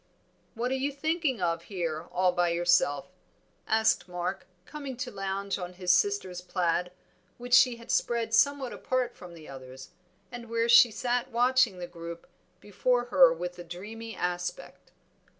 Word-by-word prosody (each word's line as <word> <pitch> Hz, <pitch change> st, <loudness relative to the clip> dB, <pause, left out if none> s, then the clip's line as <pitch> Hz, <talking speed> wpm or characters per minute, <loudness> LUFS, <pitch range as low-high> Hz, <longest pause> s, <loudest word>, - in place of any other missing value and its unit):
"What 240 Hz, +3 st, -2 dB
are -, -, +1 dB
you 265 Hz, +2 st, -1 dB
thinking 300 Hz, -, -1 dB
of 165 Hz, -1 st, -1 dB
here 170 Hz, -4 st, -4 dB
all 185 Hz, 0 st, +2 dB
by 175 Hz, -1 st, +1 dB
yourself?" 170 Hz, -2 st, +2 dB, 0.6 s
asked 220 Hz, -5 st, +2 dB
Mark, 180 Hz, 0 st, -4 dB, 0.2 s
coming 280 Hz, -1 st, -7 dB
to 255 Hz, 0 st, -4 dB
lounge 195 Hz, 0 st, -3 dB
on 180 Hz, 0 st, -6 dB
his 180 Hz, 0 st, +2 dB
sister's 185 Hz, -1 st, 0 dB
plaid, 180 Hz, -1 st, -1 dB, 0.5 s
which 245 Hz, 0 st, -6 dB
she 255 Hz, -1 st, +6 dB
had 235 Hz, 0 st, -8 dB
spread 230 Hz, -1 st, 0 dB
somewhat 275 Hz, +1 st, +2 dB
apart 255 Hz, -2 st, -2 dB
from 175 Hz, -2 st, -12 dB
the 155 Hz, -2 st, -13 dB
others, 130 Hz, +1 st, -11 dB, 0.4 s
and 240 Hz, -2 st, -8 dB
where 230 Hz, 0 st, 0 dB
she 235 Hz, +1 st, +8 dB
sat 240 Hz, +3 st, -2 dB
watching 245 Hz, -3 st, +3 dB
the 180 Hz, -, -5 dB
group 170 Hz, -1 st, -9 dB, 0.3 s
before 240 Hz, +4 st, 0 dB
her 270 Hz, -3 st, +8 dB
with 180 Hz, +2 st, -5 dB
a -, -, -6 dB
dreamy 215 Hz, +6 st, -8 dB
aspect. 180 Hz, -, -4 dB
200 Hz, 155 wpm, -28 LUFS, 175-245 Hz, 0.6 s, she